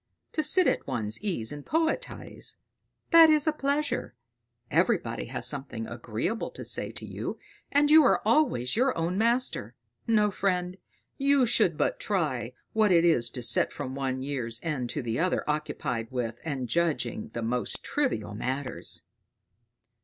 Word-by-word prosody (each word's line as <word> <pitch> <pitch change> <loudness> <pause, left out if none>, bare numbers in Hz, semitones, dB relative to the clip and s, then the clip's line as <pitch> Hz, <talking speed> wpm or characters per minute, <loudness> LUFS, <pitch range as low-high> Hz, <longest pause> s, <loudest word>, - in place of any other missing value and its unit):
To 310 - 0
sit 345 +4 +5
at - - +1
one's 110 -5 -2
ease 175 - -2
and 145 -1 -7
poetise 325 - -2 0.6
that 330 -1 +9
is 305 -2 +4
a 310 - +2
pleasure; 285 - -1 0.6
everybody 60 - +1
has - - -5
something 135 -5 -4
agreeable 120 - -3
to - - -9
say - - -2
to - - -7
you, - - -5 0.3
and 290 +1 +3
you 315 0 +9
are - - +4
always 225 - +2
your 255 +3 +2
own 165 +2 -1
master. 230 - +1 0.3
No, 210 -2 +3
friend, 185 -2 -1 0.4
you 275 -1 +4
should 215 -9 +3
but - - 0
try 140 - -1 0.2
what 215 -2 +3
it 170 -1 +5
is 120 -9 +3
to 125 - -6
sit - - +2
from 130 -2 -5
one 130 -1 -2
year's 120 -5 -3
end 140 -7 -2
to 130 +3 -3
the 115 +1 -2
other 180 +2 0
occupied 125 -6 -2
with 120 -2 -3
and 140 -6 -3
judging 125 -5 -1
the 115 - -2
most 120 +2 -2
trivial 280 - -1
matters." 130 +4 -4
155 Hz, 155 wpm, -28 LUFS, -, 0.6 s, that